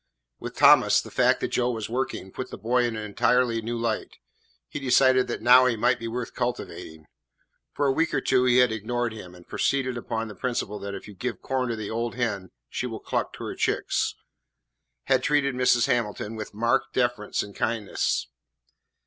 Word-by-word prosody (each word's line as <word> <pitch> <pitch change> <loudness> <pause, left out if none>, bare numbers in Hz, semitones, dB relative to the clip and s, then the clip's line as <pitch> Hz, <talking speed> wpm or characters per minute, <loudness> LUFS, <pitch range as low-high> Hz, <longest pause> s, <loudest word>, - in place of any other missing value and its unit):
With - - -7
Thomas, - - +6
the - - -7
fact - - +3
that - - -1
Joe 125 0 +1
was 115 -3 -3
working 120 -5 -3
put 130 +5 -6
the - - -8
boy 120 +2 +1
in 120 -2 -2
an 110 - -4
entirely 115 +3 +1
new 120 +2 -3
light. 115 -1 -3 0.5
He - - -6
decided 130 -1 +4
that - - -4
now 125 +2 +7
he 120 - +1
might 110 - +2
be 115 - -5
worth 120 +1 -4
cultivating. 100 -10 -5 0.7
For 145 - -1
a 135 - +3
week 160 +4 +1
or - - +1
two 130 -1 +2
he 125 0 +4
had 125 -2 +5
ignored 115 +2 -2
him, 90 -5 -10
and, 90 -1 -16
proceeding 130 -3 0
upon 115 -1 -3
the 105 - -8
principle 105 -2 -3
that 100 0 -5
if 100 - -9
you 105 - -10
give 115 +6 -5
corn 130 -2 -1
to 115 - -1
the 110 -2 -5
old 115 +1 -2
hen 105 -7 -2 0.2
she - - -3
will - - -6
cluck - - -2
to - - -8
her - - -4
chicks, - - 0 0.9
had 130 -1 +2
treated 140 -1 +1
Mrs. 125 -1 +3
Hamilton 115 -1 -1
with 110 -1 -6
marked 115 +3 0
deference 120 -4 0
and 100 -1 -11
kindness. 110 -3 -1
120 Hz, 200 wpm, -26 LUFS, 110-125 Hz, 0.9 s, now